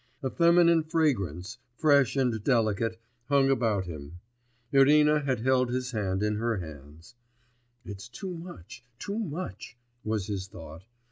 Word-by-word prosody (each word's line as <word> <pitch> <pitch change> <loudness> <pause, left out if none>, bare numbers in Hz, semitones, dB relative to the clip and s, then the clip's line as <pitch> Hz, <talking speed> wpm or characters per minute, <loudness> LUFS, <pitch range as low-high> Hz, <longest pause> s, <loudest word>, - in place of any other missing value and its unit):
A 130 - -1
feminine 170 -1 +5
fragrance, 120 - -1 0.2
fresh 140 -5 +4
and 125 -6 0
delicate, 115 -2 +1 0.3
clung 140 -1 +3
about 110 -7 +1
him.... 80 0 -9 0.5
Irina 150 +2 +5
had 130 -5 -1
held 130 0 +2
his 125 0 -2
hand 100 -3 -1
in 105 0 0
her 115 0 -1
hands. 80 - -10 0.7
'It's 100 +2 -8
too 185 +9 -6
much, 165 - -10
too 205 - -4
much,' 155 - -6 0.3
was 110 -3 -1
his 100 -2 -4
thought. 80 -1 -11
120 Hz, 135 wpm, -28 LUFS, 100-145 Hz, 0.7 s, feminine